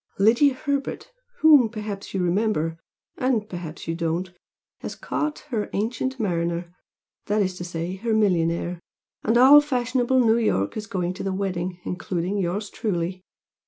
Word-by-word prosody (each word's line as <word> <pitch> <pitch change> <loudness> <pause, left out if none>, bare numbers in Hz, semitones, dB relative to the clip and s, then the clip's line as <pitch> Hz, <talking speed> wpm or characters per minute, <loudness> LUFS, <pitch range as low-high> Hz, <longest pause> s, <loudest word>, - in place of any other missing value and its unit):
Lydia 240 +7 +4
Herbert, 280 - -3 0.3
whom 290 -7 +7
perhaps 210 -3 -6
you 190 -2 -1
remember, 175 -3 0 0.4
and 245 -5 0
perhaps 175 -5 -7
you 165 - -1
don't, 170 +2 -2 0.5
has - - -6
caught 305 0 -3
her 215 -4 -1
'ancient 250 +5 -2
mariner' 170 -3 -1 0.5
that 210 0 +2
is 185 -1 -1
to - - -4
say, 175 +1 -4
her 225 +2 0
millionaire, 175 -4 +1 0.4
and 225 +2 +3
all 275 +4 +9
fashionable 255 -2 +1
New 230 -2 +4
York 100 - 0
is 215 0 -5
going 180 -3 -2
to - - -7
the 195 - -1
wedding, 185 -2 -3
including 180 +2 -2
yours 195 +3 -2
truly. 185 -4 -2
200 Hz, 150 wpm, -24 LUFS, 175-235 Hz, 0.5 s, all